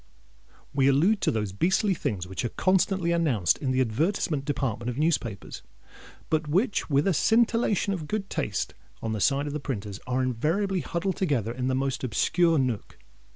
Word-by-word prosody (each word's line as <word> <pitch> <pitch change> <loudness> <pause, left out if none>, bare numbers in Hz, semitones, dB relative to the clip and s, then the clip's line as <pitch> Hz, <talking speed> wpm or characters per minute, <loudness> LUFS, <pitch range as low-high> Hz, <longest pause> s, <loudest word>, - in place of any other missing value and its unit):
We 135 -1 +3
allude 170 +10 +3
to - - +2
those 105 -3 -1
beastly 190 - +2
things 100 - -3
which 95 +3 -5
are 120 - -1
constantly 185 - +1
announced 140 - +2
in 135 - -2
the 130 0 +2
advertisement 145 - 0
department 125 -5 -2
of 125 - -4
newspapers, 135 - -1 0.7
but 155 -1 +1
which, 190 - 0
with 140 0 +2
a 195 - +3
scintillation 225 +1 +2
of 160 -5 -5
good 210 +1 -2
taste - - -2 0.3
on 115 - -2
the 105 - -3
side 140 +4 +2
of 145 - -4
the 150 - -2
printers, 105 -8 -5
are 130 +1 0
invariably 165 - 0
huddled 175 +2 -2
together 135 - 0
in 125 +1 -3
the 130 - +1
most 135 -1 -1
obscure 165 - +2
nook. 125 -6 -2
145 Hz, 175 wpm, -27 LUFS, 125-180 Hz, 0.7 s, We